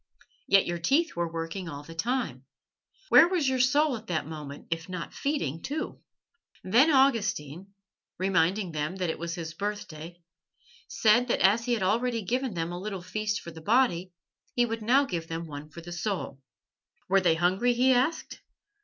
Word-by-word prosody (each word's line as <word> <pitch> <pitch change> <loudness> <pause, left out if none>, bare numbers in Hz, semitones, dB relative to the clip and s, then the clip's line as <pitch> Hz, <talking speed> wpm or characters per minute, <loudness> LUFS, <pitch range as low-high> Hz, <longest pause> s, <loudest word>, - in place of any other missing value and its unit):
Yet 195 -1 +5
your 175 0 -3
teeth 285 - +1
were 170 -1 -2
working 165 +2 -5
all 145 -1 -7
the 165 - -11
time. 195 - -2 0.6
Where 335 - +8
was 350 -6 0
your 260 -1 +1
soul 285 +2 +3
at 225 0 -10
that 160 -4 -1
moment 150 -2 -8
if 165 +1 -3
not 180 -2 -6
feeding 165 - -2
too?" 305 +3 -4 0.6
Then 240 +11 +4
Augustine, 200 - +1 0.4
reminding 185 0 +1
them 155 +3 -3
that 180 -3 -1
it - - -7
was 170 0 -4
his 160 -2 -6
birthday, 175 -4 -6 0.7
said 235 +3 +3
that - - 0
as 210 +5 +4
he 245 - +1
had 215 - -2
already 230 +3 0
given 250 +1 -1
them 165 0 -2
a 175 +1 -5
little 195 -3 -5
feast 210 +3 -2
for 170 - -9
the 160 0 -11
body, 190 -3 +2 0.4
he 245 - +3
would 225 -1 -4
now 260 +6 +4
give 170 -9 -4
them 165 +1 -4
one 150 -1 -8
for 170 +3 -10
the 175 +1 -10
soul. 175 -6 -3 0.7
Were 195 +1 +4
they 170 -3 +3
hungry? 190 +9 +2
he 255 +2 +4
asked. 275 +6 -1
190 Hz, 180 wpm, -28 LUFS, 165-245 Hz, 0.7 s, Where